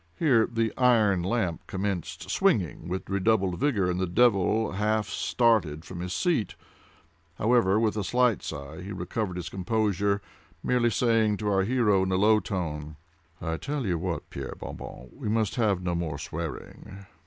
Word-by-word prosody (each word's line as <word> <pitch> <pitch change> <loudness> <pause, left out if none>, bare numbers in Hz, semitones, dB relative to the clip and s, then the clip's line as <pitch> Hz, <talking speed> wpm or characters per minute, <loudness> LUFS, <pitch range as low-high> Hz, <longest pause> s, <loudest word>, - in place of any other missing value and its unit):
Here 125 -9 +3
the 115 -1 0
iron 110 -7 +4
lamp 95 -3 -1
commenced 95 -3 -3
swinging - - +1
with 95 +2 -4
redoubled 95 -2 +1
violence, 105 -11 +1
and 90 - -2
the 95 - 0
devil 110 +1 +3
half 105 +1 0
started 100 -10 +1
from 90 - -8
his 90 +1 -4
seat;—however, 100 - -1
with 110 -2 +1
a 105 - -1
slight 125 +1 +2
sigh, 75 +2 -7
he 95 +3 -7
recovered 95 +1 -3
his 90 - -5
composure, 100 0 0 0.4
merely 125 -1 +2
saying 115 -3 +2
to 105 0 -2
our 95 -1 +3
hero 105 -2 +2
in 95 0 0
a - - +2
low 105 +3 +4
tone: 80 -7 -4 0.4
"I 80 -1 -3
tell 145 - -3
you 90 -4 0
what, 85 -1 -3
Pierre 70 -1 -6
Bon - - -7
Bon, 65 - -9
we - - -5
must 110 -2 +1
have 105 -6 +1
no 90 -1 -1
more 85 -4 -2
swearing." 85 +5 -7
100 Hz, 165 wpm, -27 LUFS, 90-110 Hz, 0.4 s, iron